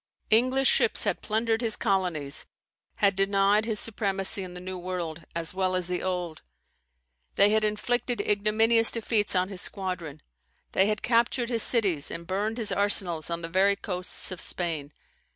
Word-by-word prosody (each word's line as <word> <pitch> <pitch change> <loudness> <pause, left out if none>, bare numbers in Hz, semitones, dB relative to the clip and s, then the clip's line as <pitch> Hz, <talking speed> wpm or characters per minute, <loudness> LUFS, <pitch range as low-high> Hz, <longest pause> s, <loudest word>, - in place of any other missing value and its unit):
English 255 +4 +3
ships - - +3
had - - -1
plundered 225 +1 -1
his 225 -3 +3
colonies; 180 -9 -1 0.5
had 200 -2 +2
denied 195 +2 +2
his 220 -2 -2
supremacy 195 -2 -2
in 180 -1 -9
the - - -7
New 185 +1 -6
World, 175 -3 -5
as 165 0 -2
well 185 -1 0
as 185 -1 +1
the 180 0 -3
Old; 180 -4 -3 0.9
they 200 +1 +5
had 215 0 +2
inflicted 240 +3 -1
ignominious 220 +2 +3
defeats 220 -3 0
on 185 +1 +1
his 195 -3 -1
squadrons; 180 -6 -3 0.5
they 190 - +3
had 210 0 -2
captured 235 0 +1
his 230 -2 -1
cities, 195 - +3
and 170 0 -7
burned 205 +5 -2
his 220 -3 -1
arsenals 180 -6 +1
on 170 0 -4
the - - -3
very 190 +4 +3
coasts 185 -2 -2
of 185 - -6
Spain. 160 -5 -4
195 Hz, 165 wpm, -27 LUFS, 180-220 Hz, 0.9 s, they